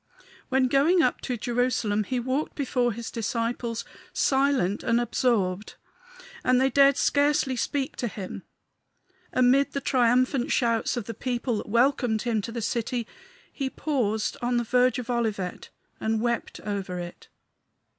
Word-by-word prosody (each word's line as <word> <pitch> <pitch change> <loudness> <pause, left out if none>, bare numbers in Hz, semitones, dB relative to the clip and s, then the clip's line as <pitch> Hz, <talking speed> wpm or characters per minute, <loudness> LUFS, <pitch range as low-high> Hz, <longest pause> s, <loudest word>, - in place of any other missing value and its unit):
When 260 0 +3
going 310 +7 +4
up 250 - +1
to 250 -2 -3
Jerusalem 230 -3 0
he 255 +3 -1
walked 260 +5 -2
before 250 -4 0
his 230 +1 -6
disciples, 230 0 -2 0.3
silent 265 -8 +2
and 230 +1 +2
absorbed; 215 -5 0 0.7
and 255 0 +3
they 265 +1 +2
dared 275 +1 +5
scarcely 285 -2 +2
speak 280 +3 -2
to 240 - -1
him. 195 -3 -6 0.9
Amid 255 +2 +3
the 280 - -1
triumphant 255 +1 +2
shouts 230 0 +1
of 235 - -3
the 230 - -5
people 240 0 -2
that 205 - -6
welcomed 235 -1 +2
him 230 -3 0
to 230 - -6
the 230 -1 -4
city 235 +1 -1 0.5
he 270 -2 -2
paused 240 -7 -1
on 245 0 +1
the 240 - +1
verge 250 +2 +2
of 250 -2 -5
Olivet 215 -6 -2 0.3
and 220 0 0
wept 235 0 -2
over 195 -3 -4
it. 175 0 -8
245 Hz, 145 wpm, -26 LUFS, 225-260 Hz, 0.9 s, dared